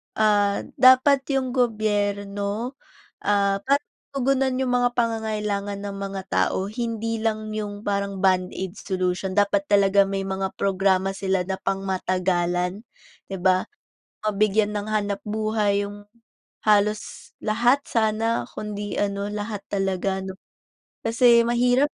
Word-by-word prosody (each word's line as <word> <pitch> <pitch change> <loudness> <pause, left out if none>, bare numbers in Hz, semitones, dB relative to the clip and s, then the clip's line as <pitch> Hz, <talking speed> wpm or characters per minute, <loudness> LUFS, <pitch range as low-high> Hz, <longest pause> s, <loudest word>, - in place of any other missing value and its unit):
ah, 205 -2 +2 0.2
dapat 260 +2 +6
yung 260 -1 0
gobyerno, 205 -1 -1 0.5
ah, 200 -1 +2
parang 280 +2 +2 0.3
tugunan 265 -1 +1
yung 250 - -1
mga 245 0 +2
pangangailangan 210 -3 -1
ng 200 - -5
mga 195 -1 -4
tao 190 +1 0
hindi 230 0 -3
lang 215 -1 -1
yung 205 -1 -5
parang 200 -1 -2
band-aid 185 0 0
solution. 185 0 -2
Dapat 200 -1 +2
talaga 200 0 +5
may 195 0 -2
mga 190 0 -2
programa 195 -1 +2
sila 190 -1 0
na 190 - -1
pangmatagalan, 185 -1 -1 0.4
di 195 - -5
ba? 185 0 +3 0.6
Mabigyan 215 0 +2
ng 205 0 -2
hanapbuhay 210 0 0
yung 205 0 -11 0.6
halos 210 0 +1
lahat 240 +6 +3
sana 220 - +1
kundi 205 -1 -5
ano, 200 0 -1
lahat 210 -1 -4
talaga 195 -1 -1
'no. 190 - -5 0.7
Kasi 235 +1 +5
mahirap 245 +3 +3
205 Hz, 115 wpm, -24 LUFS, 195-225 Hz, 0.7 s, dapat